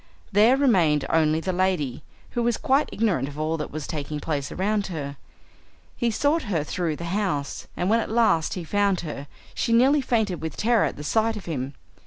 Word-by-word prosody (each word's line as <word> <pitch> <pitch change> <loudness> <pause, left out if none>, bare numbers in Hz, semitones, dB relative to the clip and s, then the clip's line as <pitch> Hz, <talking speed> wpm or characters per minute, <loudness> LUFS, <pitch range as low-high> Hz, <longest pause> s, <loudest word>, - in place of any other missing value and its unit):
There 220 +6 +5
remained 175 - +3
only 160 0 +3
the 185 +2 -2
lady, 175 -9 0 0.3
who 240 - -1
was 235 -1 +1
quite 285 -1 +2
ignorant 185 - 0
of 145 +1 -9
all 155 +1 0
that 150 - -4
was 155 -1 -5
taking 150 -1 -4
place 145 -2 -3
around 205 +2 0
her. 145 -6 -5 0.8
He 240 - 0
sought 290 +8 +1
her 165 -7 +1
through 165 0 -2
the 170 - -7
house, 185 -9 -2
and 180 - 0
when 225 +3 +4
at - - -3
last 220 -8 +2
he 180 - -4
found 200 +2 +1
her, 145 -3 -6 0.3
she 230 - 0
nearly 270 +5 +5
fainted 220 -8 0
with 160 -2 -5
terror 230 0 +3
at - - -3
the 150 - -7
sight 220 +7 +1
of 200 - -9
him. 140 -4 -4
185 Hz, 200 wpm, -25 LUFS, 150-225 Hz, 0.8 s, There